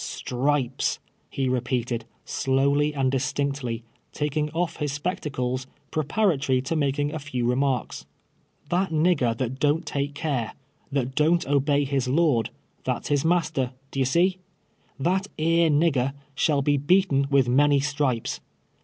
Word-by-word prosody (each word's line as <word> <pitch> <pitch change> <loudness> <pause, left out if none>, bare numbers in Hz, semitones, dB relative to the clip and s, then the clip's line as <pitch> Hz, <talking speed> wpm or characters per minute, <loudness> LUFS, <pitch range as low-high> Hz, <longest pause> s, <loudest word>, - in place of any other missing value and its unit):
^^ - - -5
Stripes,''' 130 0 -1 0.3
he 135 -1 -1
repeated, 125 -2 -1 0.2
slowly 140 +3 +1
and 135 -3 0
distinctly, 135 -3 -2 0.3
taking 150 0 -1
off 165 +2 -2
his 145 -2 -2
S2')ectacles, 130 -6 -3 0.2
j^treparatory 150 -5 +1
to 165 - -1
making 145 0 0
a 155 - -3
few 130 -5 -2
re 125 - +2
marks. 135 -3 -1 0.6
''That 185 +2 +1
nigger 155 -8 +2
that 130 +1 -3
don't 150 +3 +2
take 140 0 -2
care 140 -7 -2 0.2
— 150 - -38
that 135 -2 -1
don't 160 +4 +2
obey 145 +1 +2
his 135 -2 -1
lord 130 -5 +2 0.2
— - - -40
that's - - -2
his 145 -2 +2
master 155 -6 +1
— 135 - -37
d'ye 135 - 0
see? 180 +7 +2 0.3
— - - -37
that 190 +2 +1
^ej^e 165 +1 +3
nigger 145 -3 +2 0.2
shall 145 -1 +1
be 145 +1 +2
beaten 145 -2 +3
Avith 140 -3 +3
many 140 +3 +4
stripes. 140 -4 -1
140 Hz, 150 wpm, -25 LUFS, 130-155 Hz, 0.6 s, many